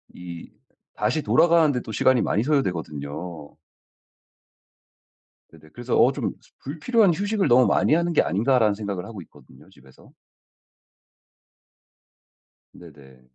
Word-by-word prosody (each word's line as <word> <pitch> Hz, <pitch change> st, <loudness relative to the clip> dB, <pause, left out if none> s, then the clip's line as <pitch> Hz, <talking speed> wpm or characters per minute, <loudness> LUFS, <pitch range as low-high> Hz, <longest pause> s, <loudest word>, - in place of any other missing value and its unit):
이 85 Hz, -1 st, -10 dB, 0.5 s
다시 105 Hz, +9 st, -1 dB
돌아가는 165 Hz, 0 st, +3 dB
데 125 Hz, -, -2 dB
또 110 Hz, -, -9 dB
시간이 125 Hz, +3 st, +2 dB
많이 105 Hz, -, 0 dB
소요되거든요. 85 Hz, -, -4 dB, 2.0 s
네네. 80 Hz, -1 st, -19 dB
그래서 120 Hz, +1 st, -3 dB
어 -, -, +5 dB
'좀 -, -, -3 dB, 0.3 s
불필요한 185 Hz, -, +1 dB
휴식을 205 Hz, +2 st, -1 dB
너무 125 Hz, +1 st, +5 dB
많이 -, -, +2 dB
하는 170 Hz, +1 st, 0 dB
게 160 Hz, -, +3 dB
아닌가?'라는 110 Hz, +1 st, +1 dB
생각을 100 Hz, -3 st, -5 dB
하고 110 Hz, -4 st, -9 dB
있거든요 -, -, -19 dB
집에서. 65 Hz, 0 st, -20 dB, 2.6 s
네네. 70 Hz, -6 st, -16 dB
110 Hz, 270 characters per minute, -23 LUFS, -, 2.6 s, 어